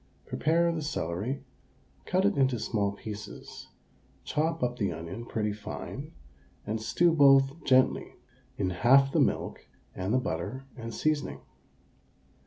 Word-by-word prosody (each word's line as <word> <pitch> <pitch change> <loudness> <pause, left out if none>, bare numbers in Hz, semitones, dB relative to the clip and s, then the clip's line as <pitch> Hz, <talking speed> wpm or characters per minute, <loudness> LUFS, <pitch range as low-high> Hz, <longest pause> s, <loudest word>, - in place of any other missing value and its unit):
Prepare 170 +2 +2
the 165 -1 -3
celery, 125 - -3 0.6
cut 185 +1 +2
it 205 -1 +3
into 130 -2 +2
small 105 -2 0
pieces, 105 0 -8 0.6
chop 160 +1 -1
up 125 0 -1
the 100 - +1
onion 90 +9 -7
pretty 105 -2 -1
fine, 105 0 -7 0.5
and 110 +1 -2
stew 170 +10 +3
both 135 0 +5
gently 130 -1 +3 0.4
in 95 -2 0
half 135 +9 +5
the - - +2
milk - - -1 0.3
and 95 +2 -3
the 125 - +4
butter 115 +4 -3
and 115 -2 -6
seasoning. 155 +5 -1
125 Hz, 130 wpm, -29 LUFS, 105-145 Hz, 0.6 s, both